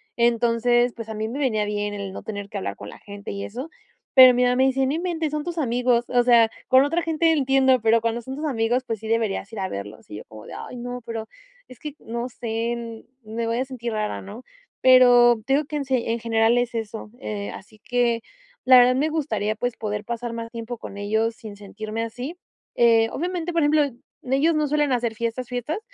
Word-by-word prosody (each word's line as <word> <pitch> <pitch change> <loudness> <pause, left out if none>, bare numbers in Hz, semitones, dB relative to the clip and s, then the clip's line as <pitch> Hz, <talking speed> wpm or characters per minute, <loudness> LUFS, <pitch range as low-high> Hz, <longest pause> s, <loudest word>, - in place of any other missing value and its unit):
Entonces, 240 +1 +2
pues, 225 -1 -8
a 220 - -5
mí 215 +1 -2
me 265 +6 -5
venía 215 -7 +1
bien 205 0 -2
el 200 -2 -5
no - - -8
tener 205 -2 -6
que 205 - -5
hablar 100 - -4
con 105 - -9
la - - -12
gente 200 -1 -9
y 200 0 -5
eso. 255 +9 -6 0.5
Pero 255 -1 +10
mi 250 - +3
mamá 250 0 +3
me 260 +1 +3
dice: 265 0 +2
"No 270 - 0
inventes, 325 -2 -2
son 300 -1 -2
tus 345 0 -5
amigos". 245 -3 +1
O 245 -1 +3
sea, 235 -2 +5 0.2
con 260 +1 +6
otra 330 +4 0
gente 325 0 +2
entiendo, 265 -4 +3
pero 225 +1 +4
cuando 230 +1 -2
son 265 +3 -7
tus 310 - -4
amigos, 245 -1 0
pues, 225 -3 -3
sí 220 - -8
deberías 225 -2 -1
ir 215 - -6
a 190 - -1
verlos, 100 +2 -8
y 105 - -7
yo - - -9
como 110 -1 -12
de: - - -10
"Ay 250 - -8
no, 245 +1 -6
pero 225 -1 -5 0.4
es 255 - -14
que 300 -1 -7
no 235 +2 -5
sé 230 0 -4 0.2
me 225 +2 -4
voy 230 +1 0
a 260 - 0
sentir 240 -3 -5
rara", 215 -1 -2
¿no? 210 +6 -10 0.4
Pero 245 -2 +6
te 270 - +2
digo 290 +1 +2
que 300 0 -4
en 280 - -3
sí, 260 -3 0
en 230 +1 -1
general, 225 +1 +2
es 245 -1 -1
eso. 220 -1 -5 0.4
Así 215 +2 -13
que, 240 -1 0 0.4
la 255 0 +8
verdad, 250 +1 +6
me 295 +4 +1
gustaría, 220 -9 -1
pues, 245 +1 -3
poder 210 -1 -3
pasar 235 0 -4
más 230 0 -6
tiempo 230 0 -6
con 200 - -9
ellos 220 +3 0
sin 215 -4 -10
sentirme 215 +2 -6
así. 245 +9 -6 0.4
Eh, 230 -1 +5
obviamente, 350 +1 -3
por 335 - +2
ejemplo, 295 +1 +4 0.5
ellos 305 +5 +3
no 305 -1 +1
suelen 295 -1 +1
hacer 235 -3 0
fiestas 235 +2 -3
fiestas, 250 - -3
235 Hz, 225 wpm, -23 LUFS, 220-260 Hz, 0.5 s, Pero